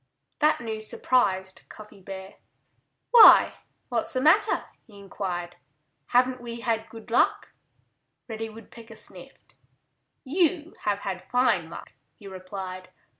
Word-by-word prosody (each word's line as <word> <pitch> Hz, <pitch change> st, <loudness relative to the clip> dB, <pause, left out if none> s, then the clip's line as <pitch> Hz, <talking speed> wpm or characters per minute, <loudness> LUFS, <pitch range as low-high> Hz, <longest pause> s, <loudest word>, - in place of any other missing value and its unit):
That 305 Hz, +1 st, +3 dB
news 220 Hz, -2 st, -4 dB
surprised 190 Hz, -8 st, 0 dB
Cuffy 210 Hz, -2 st, -14 dB
Bear. 190 Hz, +1 st, -10 dB, 0.7 s
"Why, 470 Hz, -3 st, +8 dB, 0.3 s
what's 235 Hz, -2 st, -2 dB
the 255 Hz, -, 0 dB
matter?" 400 Hz, +10 st, +3 dB, 0.2 s
he 210 Hz, -3 st, -16 dB
inquired. 180 Hz, -3 st, -6 dB, 0.5 s
"Haven't 250 Hz, +1 st, +2 dB
we 235 Hz, -1 st, -7 dB
had 225 Hz, -1 st, -2 dB
good 225 Hz, 0 st, -12 dB
luck?" 235 Hz, -, +1 dB, 0.7 s
Reddy 225 Hz, -1 st, -5 dB
Woodpecker 225 Hz, +1 st, -13 dB
sniffed. -, -, -15 dB, 0.7 s
"You 320 Hz, +2 st, 0 dB
have 205 Hz, -1 st, 0 dB
had 190 Hz, -2 st, -6 dB
fine 250 Hz, +1 st, +1 dB
luck," -, -, -11 dB, 0.2 s
he 205 Hz, -, -13 dB
replied. 185 Hz, -1 st, -8 dB
225 Hz, 120 wpm, -25 LUFS, 195-250 Hz, 0.7 s, Why